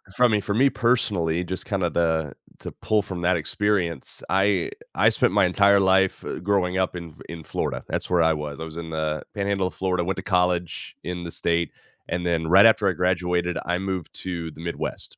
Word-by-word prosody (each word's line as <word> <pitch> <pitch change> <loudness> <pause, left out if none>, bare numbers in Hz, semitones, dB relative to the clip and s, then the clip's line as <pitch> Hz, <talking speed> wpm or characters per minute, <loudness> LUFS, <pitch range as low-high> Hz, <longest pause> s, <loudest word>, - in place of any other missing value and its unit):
from 125 0 +4
me 105 - +3
for 100 0 -3
me 130 +6 +4
personally, 100 -10 +1
just 95 +1 -5
kinda, 95 -4 0
the 80 -4 0 0.3
to - - -7
pull 110 -1 0
from 95 -3 -6
that 90 0 +2
experience, 85 -2 -1
I 95 -1 +2 0.2
I - - +4
spent - - +1
my - - +4
entire 100 +2 +4
life, 95 0 +2
uh, - - -4
growing 95 -2 0
up 95 -1 0
in 85 -3 -8
in 85 -1 -8
Florida, - - -3
that's - - -3
where 90 -2 +3
I 80 0 +4
was, 75 -1 -5
I - - -4
was 80 0 -10
in 85 -1 -6
the 80 -1 -2
Panhandle 100 -1 -1
of - - -8
Florida, 90 -2 -1
went 95 +1 -2
to - - -3
college 90 -3 0
in 90 -1 -4
the 85 - -6
state, 85 0 0 0.4
and 90 +1 -2
then 85 -2 0
right 95 +5 +7
after 110 -2 +3
I 95 - +2
graduated, 90 -1 0
I 90 +1 0
moved 95 -3 -4
to 85 -3 -4
the 75 - -12
Midwest. 85 0 -3
90 Hz, 210 wpm, -24 LUFS, 85-95 Hz, 0.4 s, right